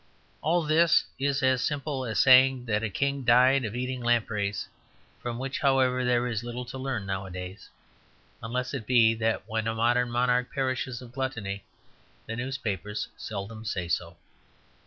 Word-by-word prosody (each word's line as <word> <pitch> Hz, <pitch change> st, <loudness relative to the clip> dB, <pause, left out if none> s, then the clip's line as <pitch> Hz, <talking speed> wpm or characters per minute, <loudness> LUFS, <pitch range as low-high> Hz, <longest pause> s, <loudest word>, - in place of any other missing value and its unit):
All 170 Hz, +3 st, +2 dB
this 155 Hz, +2 st, +4 dB, 0.2 s
is 140 Hz, 0 st, 0 dB
as 130 Hz, -1 st, +3 dB
simple 140 Hz, -2 st, -2 dB
as 110 Hz, -3 st, -3 dB
saying 130 Hz, +1 st, +6 dB
that 105 Hz, -3 st, 0 dB
a 115 Hz, -, -1 dB
king 140 Hz, +6 st, -1 dB
died 125 Hz, +3 st, +5 dB
of 110 Hz, 0 st, -4 dB
eating 125 Hz, 0 st, -3 dB
lampreys, 110 Hz, -4 st, 0 dB, 0.5 s
from 120 Hz, -1 st, -4 dB
which, 135 Hz, +2 st, -3 dB
however, 130 Hz, -2 st, +2 dB
there 125 Hz, 0 st, +2 dB
is 115 Hz, -2 st, -2 dB
little 120 Hz, +1 st, -5 dB
to 125 Hz, +2 st, -7 dB
learn 130 Hz, -7 st, -3 dB
nowadays, 95 Hz, 0 st, -6 dB, 0.7 s
unless 125 Hz, +4 st, -3 dB
it 120 Hz, -6 st, -5 dB
be 115 Hz, -3 st, +5 dB
that 110 Hz, -2 st, -1 dB
when 110 Hz, -1 st, -2 dB
a 115 Hz, -, -1 dB
modern 120 Hz, +2 st, +2 dB
monarch 125 Hz, +1 st, +1 dB
perishes 130 Hz, -2 st, -2 dB
of 120 Hz, -, -12 dB
gluttony 115 Hz, -7 st, -4 dB, 0.6 s
the 115 Hz, -, -5 dB
newspapers 110 Hz, -5 st, -3 dB
seldom 110 Hz, +1 st, -6 dB
say 90 Hz, -5 st, -3 dB
so. 85 Hz, -, -2 dB
120 Hz, 155 wpm, -27 LUFS, 110-130 Hz, 0.7 s, saying